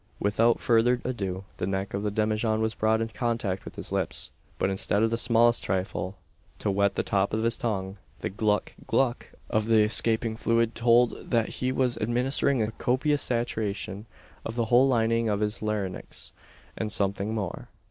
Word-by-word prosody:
Without 115 +3 +2
further 120 +1 +3
ado 100 -7 -3
the 90 - -2
neck 95 0 -2
of 100 - -1
the 105 - -1
demijohn 110 +1 0
was 110 0 0
brought 110 +1 +1
in 115 - -2
contact 115 -5 -2
with - - -9
his - - -6
lips; - - -2 0.3
but 95 - 0
instead 100 +2 +1
of 115 - +2
the - - +2
"smallest 120 0 +3
thrifle" 95 0 -2 0.4
to 100 - -1
wet 100 0 +1
the - - 0
top 100 +1 0
of 110 - -1
his 115 0 +2
tongue, 100 -4 -3 0.2
the - - -2
"gluck 105 0 0
gluck" 125 -3 0 0.2
of 110 0 0
the 110 -2 +5
escaping 110 +1 +2
fluid 115 0 +1
told 120 +1 +2
that 115 -3 +2
he 130 0 -2
was 130 -2 0
administering 125 +2 +1
a 110 - -2
copious 140 +5 +1
saturation 110 -3 -2 0.4
to - - -4
the 120 -1 0
whole 125 +4 +5
lining 115 -2 +2
of 100 -1 0
his 105 0 -1
larynx, 105 -4 -4 0.4
and 110 -1 -3
something 100 +2 -1
more. 100 -5 -4
110 Hz, 180 wpm, -27 LUFS, 100-120 Hz, 0.4 s, the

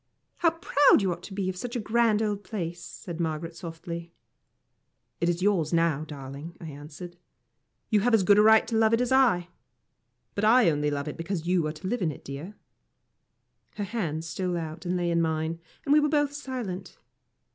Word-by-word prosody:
"How 335 - +4
proud 290 -8 +4
you 190 - +1
ought 175 0 -5
to 195 - -9
be 195 -2 -1
of 185 - -2
such 240 +6 -5
a - - 0
grand 220 0 +2
old 205 -1 -2
place!" 175 -4 -5
said 170 -1 -8
Margaret, 165 0 -3
softly. 170 0 -7 1.1
"It 170 - +1
is 175 +1 -1
yours 185 -7 +2
now, 165 -3 +2
darling," 145 +3 -8
I 165 - -7
answered. 150 +4 -10 0.7
"You 215 - +5
have 230 +3 +3
as 210 - +3
good 205 +2 +6
a - - +8
right 220 +1 +6
to 225 - -2
love 220 0 +4
it 235 - -1
as 250 - -1
I 235 -10 +4 0.8
but 200 - -3
I 220 -4 +6
only 150 0 0
love 145 0 -3
it 150 - -5
because 165 0 -3
you 175 -3 +2
are 155 - -3
to 180 +4 -7
live 245 +3 -1
in 165 -4 +1
it, - - -12
dear." 145 +9 -7 1.2
Her 205 - -3
hand 170 -7 -3
stole 175 +3 -2
out 165 +1 -6
and 180 +1 0
lay 175 -1 0
on 170 0 +2
mine, 160 0 -1 0.3
and 285 - +3
we 300 - +7
were 300 0 +2
both 290 -1 +1
silent. 255 -10 -5
180 Hz, 200 wpm, -27 LUFS, 165-220 Hz, 1.2 s, a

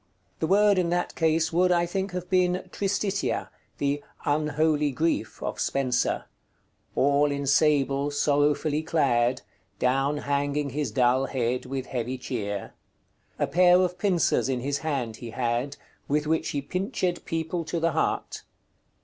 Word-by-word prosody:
The 160 - 0
word 200 +1 +4
in 175 -2 +1
that 175 +1 -1
case 160 0 +1
would, 180 +2 +3
I 175 -1 +3
think, 190 +2 -3
have 180 0 -4
been 180 0 +1
"Tristitia," 200 0 -1 0.3
the 145 0 0 0.2
"unholy 150 0 +1
Griefe" 160 +5 -1
of - - -4
Spenser 130 -3 0 0.7
"All 145 +1 +3
in 140 0 -2
sable 140 -1 +2
sorrowfully 145 +1 +1
clad, 130 -6 +1 0.3
Downe 135 +3 +1
hanging 145 0 -1
his 145 +2 -2
dull 130 +1 +2
head 125 -1 -1
with 130 0 -3
heavy 125 +1 -3
chere: 105 -6 -4 0.6
A - - +1
pair 180 0 +5
of 180 -1 0
pincers 175 -8 +2
in 125 -2 -1
his 140 +2 -1
hand 130 -8 -2
he 120 - -8
had, 120 +4 -2 0.3
With 150 +1 +1
which 160 +1 0
he 140 -1 -2
pinched 185 - -2
people 165 +1 -2
to 170 - -2
the 165 +1 +1
heart." 160 - -1
150 Hz, 145 wpm, -26 LUFS, 135-170 Hz, 0.7 s, pair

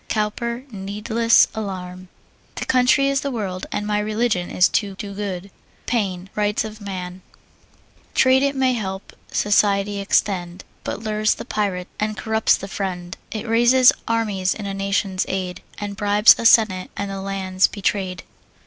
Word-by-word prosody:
COWPER, 235 +3 -2
Needless 210 +3 +2
Alarm. 185 -3 -6 0.5
My - - -3
country 260 +2 +3
is 275 0 +1
the 280 - -2
world, 200 -7 -4
and 210 - -2
my 210 0 0
religion 210 -3 0
is 180 - +4
to 200 -3 -1
do 200 +1 -7
good. 195 -1 -5 0.3
PAINE, 195 -6 -1
Rights 210 +1 0
of 215 0 -9
Man. 185 -2 -6 0.9
Trade 260 0 +5
it 280 0 +1
may 260 -1 +2
help, 190 -4 -5 0.2
society 205 -1 +2
extend, 185 -2 0 0.2
But - - -4
lures 215 0 +1
the - - -8
pirate, 195 -5 -2
and 215 0 -2
corrupts 220 0 +2
the 195 - -7
friend: 185 -3 -4
It 220 +1 -5
raises 240 +3 +6 0.2
armies 210 -5 0
in 210 - -7
a 200 - -3
nation's 195 -1 -1
aid, 185 -1 -3 0.2
But 205 -1 -5
bribes 205 +1 +6
a 230 - +5
senate, 195 -6 +4
and 200 0 -3
the 195 0 -5
land's 190 -1 +1
betray'd. 190 -3 -2
205 Hz, 155 wpm, -21 LUFS, 190-220 Hz, 0.9 s, raises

